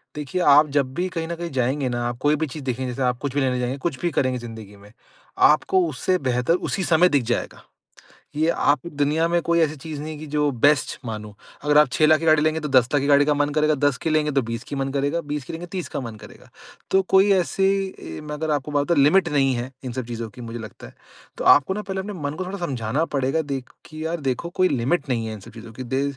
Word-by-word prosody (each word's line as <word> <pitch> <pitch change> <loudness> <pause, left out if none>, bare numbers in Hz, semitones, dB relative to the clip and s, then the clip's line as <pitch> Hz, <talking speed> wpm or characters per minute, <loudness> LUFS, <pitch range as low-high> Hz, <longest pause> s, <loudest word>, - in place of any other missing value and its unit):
देखिए 150 +5 -3
आप 150 -1 +6
जब 135 -3 +1
भी 180 +1 -1
कहीं 165 -1 -2
न 170 - -4
कहीं 170 0 -5
जाएँगे 130 +2 0
ना 120 0 -2
आप 120 0 -4
कोई 145 +2 +2
भी 160 +1 -2
चीज़ 145 +1 -8
देखें 130 0 -2
जैसे 125 +2 -5
आप 125 - -10
कुछ 140 -3 -3
भी 145 - +2
लेने 130 -1 0
जाएँगे 125 +2 -2
कुछ 140 -6 -5
भी 175 - 0
करेंगे 130 -3 0
ज़िंदगी 110 -3 -10
में 100 +1 -17 0.6
आपको 180 +4 +2
उससे 155 +6 0
बेहतर 125 +5 +1 0.2
उसी 190 - -1
समय 175 +1 +4
दिख 135 - -1
जाएगा। - - -5 0.7
ये 155 +2 +2
आप 145 -3 +2
दुनिया 150 +3 +1
में 170 0 +1
कोई 170 0 +1
ऐसी 155 -2 +2
चीज़ 150 0 -7
नहीं 155 +1 -5
है - - -9
कि 155 - -7
जो 150 -1 +2
बेस्ट 145 -2 +3
मानों। 105 -2 -6 0.3
अगर 150 0 +3
आप 150 -2 +7
6 155 - +3
लाख 155 0 +5
की 165 - -4
गाड़ी 155 -1 +5
लेंगे 155 0 +1
तो 150 - -4
10 130 -3 +4
लाख 145 - +3
की 140 - -1
गाड़ी 145 0 +5
का 150 - +3
मन 145 0 +1
करेगा, 155 0 +2
10 145 -2 +1
की - - -3
लेंगे 155 -1 +1
तो 140 -1 +2
20 115 0 -5
की - - -6
मन 135 0 -2
करेगा। 145 +4 -1
20 150 -2 -4
की - - -8
लेंगे 165 +2 -6
30 180 0 -5
का - - -4
मन 115 -4 -6
करेगा। 105 - -14 0.4
तो 190 - +5
कोई 195 +1 +5
ऐसे 190 +1 +1 0.3
ए 80 0 -8
मैं 150 0 -5
अगर 155 +1 -2
आपको 145 0 -2
बात 145 -1 +1
बताऊँ 170 -2 +2
लिमिट 175 +4 +4
नहीं 135 -3 +2
है 120 +2 -4
इन 130 - -4
सब 125 0 -4
चीज़ों 115 -1 -5
की 125 +2 -12
मुझे 115 0 -6
लगता 110 -2 -10
है। - - -17 0.4
तो - - -4
आपको 145 +7 +6
ना 210 - -3
पहले 190 -1 -4
अपने 205 +2 -5
मन 145 -6 -4
को 185 +3 -4
थोड़ा 190 +2 -5
समझाना 130 +2 -1
पड़ेगा 135 +4 +1
देख 130 -2 -5 0.2
कि 155 0 -7
यार 165 +1 -2
देखो 130 +7 -3
कोई 185 0 +5
लिमिट 140 +5 0
नहीं 115 -3 0
है 110 - -5
इन 110 - -8
सब - - -13
चीज़ों 115 0 -11
की। 130 - -7
दे 135 - +1
145 Hz, 270 wpm, -23 LUFS, 125-160 Hz, 0.7 s, आप